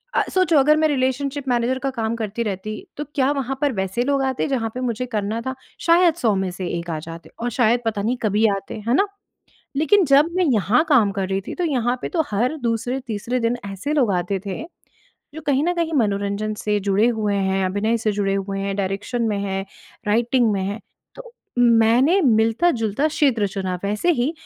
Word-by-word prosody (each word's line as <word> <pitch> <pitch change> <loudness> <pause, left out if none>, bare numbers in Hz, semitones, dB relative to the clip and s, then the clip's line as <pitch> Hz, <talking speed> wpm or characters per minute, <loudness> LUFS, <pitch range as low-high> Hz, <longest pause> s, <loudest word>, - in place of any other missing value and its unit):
अ, - - +3
सोचो 370 -4 +3
अगर 300 +3 +4
मैं - - +5
रिलेशनशिप 275 0 -1
मैनेज़र 245 +1 +1
का 270 0 -2
काम 225 0 -1
करती 220 +2 -2
रहती 210 0 -4 0.2
तो 295 - -4
क्या 275 0 +2
वहाँ 270 +1 -4
पर 290 -1 +2
वैसे 190 +5 -1
लोग 275 +1 +1
आते 265 -1 -1
जहाँ 250 -5 -1
पे - - -3
मुझे 250 -1 -2
करना 210 +2 -1
था? 260 - -2 0.2
शायद 340 0 +4
100 220 -4 +3
में 190 - -2
से 180 0 -5
1 170 +1 -8
आ 160 -2 -2
जाते 165 +1 -10
और 240 - -1
शायद 240 0 +4
पता 215 -2 -1
नहीं 240 +4 0
कभी 215 +1 +2
आते, 195 - -7
है 235 - +2
ना? 400 +7 +3 0.7
लेकिन 370 +7 +4
जब 280 +2 +5
मैं 365 0 +2
यहाँ 220 +5 +3
काम 240 -9 +4
कर 195 -1 -2
रही 195 0 -1
थी, - - -4
तो 360 - -2
यहाँ 250 -6 0
पे - - -2
तो 320 - +4
हर 240 +9 0
दूसरे-तीसरे 240 0 -2
दिन 230 +1 +1
ऐसे 195 +9 -4
लोग 260 -8 +2
आते 180 +2 -1
थे, 195 +6 -4 0.7
जो 315 - -6
कहीं 280 -1 +2
न 350 - +2
कहीं 335 -1 -1
मनोरंजन 205 0 -1
से 210 -1 0
जुड़े 200 +2 +2
हुए 215 -3 0
हैं, 190 -1 0
अभिनय 205 +5 0
से 215 -1 0
जुड़े 195 -1 +1
हुए 195 0 -3
हैं, 195 0 -2
डायरेक्शन 200 +5 -2
में 205 -2 -1
है, 195 -1 -2 0.4
राइटिंग 235 +2 +2
में 195 - -1
है, 200 +3 -3 0.4
तो - - -12 0.3
मैंने 240 - +4
मिलता-जुलता 225 +1 +2
क्षेत्र 270 -9 +2
चुना। 190 -1 -3
वैसे 210 - +1
ही 265 +6 +1
230 Hz, 205 wpm, -22 LUFS, 200-270 Hz, 0.7 s, मैं